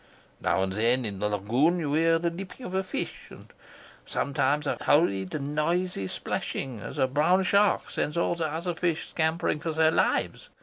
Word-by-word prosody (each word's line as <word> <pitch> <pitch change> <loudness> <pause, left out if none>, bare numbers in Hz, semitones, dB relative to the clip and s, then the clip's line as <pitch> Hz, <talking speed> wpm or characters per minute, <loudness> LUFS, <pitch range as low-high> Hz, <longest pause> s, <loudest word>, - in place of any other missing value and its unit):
Now 85 +3 +1
and 95 0 -2
then 120 +4 +1
in 100 -3 -5
the 105 - 0
lagoon 120 - +2
you 150 -4 -2
hear 165 +1 +4
the 170 +1 -1
leaping 190 +8 -8
of 185 - -6
a 190 0 +1
fish, - - -5
and - - -14 0.5
sometimes 140 +1 0
a - - 0
hurried 100 - +2
noisy 150 - -1
splashing 125 +4 -4
as - - -8
a - - +3
brown 155 +8 +3
shark 200 +2 +2
sends 150 - -2
all 170 - +2
the 165 -2 -1
other 170 +3 -2
fish 170 -1 -1
scampering 160 -1 0
for 160 +1 -3
their 160 0 +4
lives. - - 0
155 Hz, 180 wpm, -27 LUFS, 130-170 Hz, 0.5 s, hear